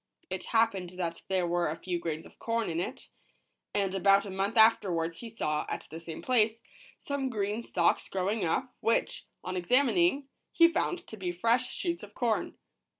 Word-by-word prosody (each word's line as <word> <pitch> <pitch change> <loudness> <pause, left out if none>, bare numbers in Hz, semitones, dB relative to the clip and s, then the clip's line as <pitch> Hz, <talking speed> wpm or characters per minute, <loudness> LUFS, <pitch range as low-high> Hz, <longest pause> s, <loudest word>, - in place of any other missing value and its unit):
It - - -3
happened 200 -6 +1
that 170 -2 -2
there 185 -2 +1
were 175 -1 +1
a 155 - -3
few 175 -1 -3
grains 160 -1 -4
of - - -17
corn 230 -4 -1
in 165 - -1
it, 175 - -5 0.7
and 195 -2 +1
about 195 +1 +4
a 200 - -6
month 195 +4 -1
afterwards 175 -7 +4
he 235 - -7
saw, 155 -9 -2
at - - -4
the 160 - -6
same 165 -1 -8
place, 230 -2 +2 0.4
some 280 -2 -1
green 210 -1 -2
stalks 170 -6 +1
growing 195 +3 -1
up, 250 +10 -1
which, 230 - 0 0.2
on 185 - -4
examining, 275 - +3 0.3
he 335 0 +6
found 360 +1 -1
to 220 - -10
be 185 -3 -2
fresh 230 +8 +1
shoots 345 -2 -2
of 205 0 -12
corn. 230 -4 0
200 Hz, 180 wpm, -30 LUFS, 175-235 Hz, 0.7 s, he